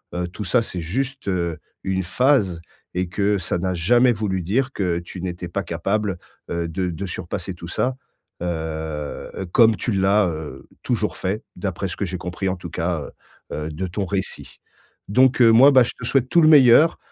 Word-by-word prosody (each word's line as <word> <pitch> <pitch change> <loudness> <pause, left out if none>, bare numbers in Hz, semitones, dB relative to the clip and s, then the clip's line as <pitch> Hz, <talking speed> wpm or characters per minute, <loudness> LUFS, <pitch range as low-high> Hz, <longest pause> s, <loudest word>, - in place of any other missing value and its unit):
heu, 90 0 -1
tout 100 +3 -7
ça, 115 +7 +3
c'est 95 -5 -5
juste, 130 - -3
heu, 85 -4 -1 0.3
une 95 0 -1
phase 95 - +2 0.3
et 90 0 -2
que 100 +2 +1
ça 85 0 -2
n'a 95 +1 -1
jamais 120 +9 +4
voulu 100 -4 -2
dire 130 +10 0
que 90 -4 -1
tu 85 +2 -9
n'étais 90 -1 -5
pas 100 +3 -2
capable, 95 +3 -1 0.3
heu, 85 0 -2
de 90 +3 -2
de 90 +3 -5
surpasser 90 +2 -5
tout 85 0 -9
ça. 125 +9 -1 0.4
Heu, 90 - -2 0.9
heu, 95 - -4
comme 115 +1 +5
tu 120 - -2
l'as, 100 0 +3
heu, 80 -2 -7 0.2
toujours - - -1
fait, 100 +4 -2
d'après 95 0 -3
ce - - -6
que 100 - -1
j'ai 90 0 -4
compris, 90 +2 -4
en 95 - -1
tout - - -8
cas, 85 -2 -2 0.5
heu - - -3
heu, 75 - -3
de 95 +5 -4
ton 95 +3 -3
récit 95 +1 -4 0.5
donc 130 +3 +4
heu, 115 -2 +8
moi, 130 +6 +8
bah, 130 -2 +7
je - - -3
te 115 - -6
souhaite 130 0 +1
tout 175 - +4
le 155 - +6
meilleur. 145 +1 +7
95 Hz, 200 wpm, -22 LUFS, 90-115 Hz, 0.9 s, heu